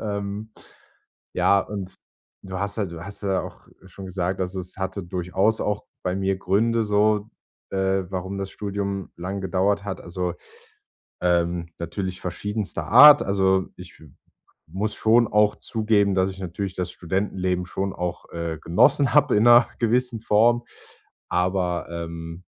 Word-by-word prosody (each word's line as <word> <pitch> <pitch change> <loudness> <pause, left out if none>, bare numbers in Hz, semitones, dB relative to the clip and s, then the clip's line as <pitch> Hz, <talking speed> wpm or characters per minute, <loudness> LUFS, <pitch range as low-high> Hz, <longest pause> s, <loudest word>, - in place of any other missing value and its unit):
ähm. 105 +1 -4 0.8
Ja, 100 - +4
und 95 -2 -6 0.5
du 95 -1 -6
hast 100 +1 -3
halt 95 -5 -2
du 85 0 -8
hast 100 +1 -10
ja 95 -1 +1
auch - - -11 0.2
schon 95 +1 -10
gesagt 90 0 -2
also, 95 +1 -2
es 90 0 -10
hatte 95 +1 -3
durchaus 90 +5 0
auch 105 -1 -2 0.2
bei 90 - 0
mir 95 0 0
Gründe 115 +5 +1
so, 105 +1 +2 0.4
äh, 95 0 0
warum 95 +1 -4
das 95 0 -4
Studium 100 -1 -4
lange 95 +3 -4
gedauert 95 +2 +1
hat, 95 -2 -5
also, 90 0 -3 0.9
ähm, 85 -1 +1
natürlich 90 +2 -4
verschiedenster 100 -2 -4
Art. 145 +5 +9
Also 95 -1 +2
ich 90 -1 -12
m 75 -4 -17 0.5
muss 105 +5 -3
schon 115 +1 +4
auch 105 0 +3
zugeben, 105 -3 +1
dass 95 0 +2
ich 95 - -12
natürlich 95 +1 -4
das 90 -1 -3
Studentenleben 90 0 -2
schon 95 +2 -3
auch, 90 -1 -5
äh, 85 -1 -4
genossen 135 - +3
habe 145 -4 +4
in 105 - +4
'ner 120 0 +7
gewissen 120 0 +1
Form. 115 +3 +3 0.7
Aber, 90 -1 0
ähm, 85 +1 -6
95 Hz, 150 wpm, -24 LUFS, 90-105 Hz, 0.9 s, Art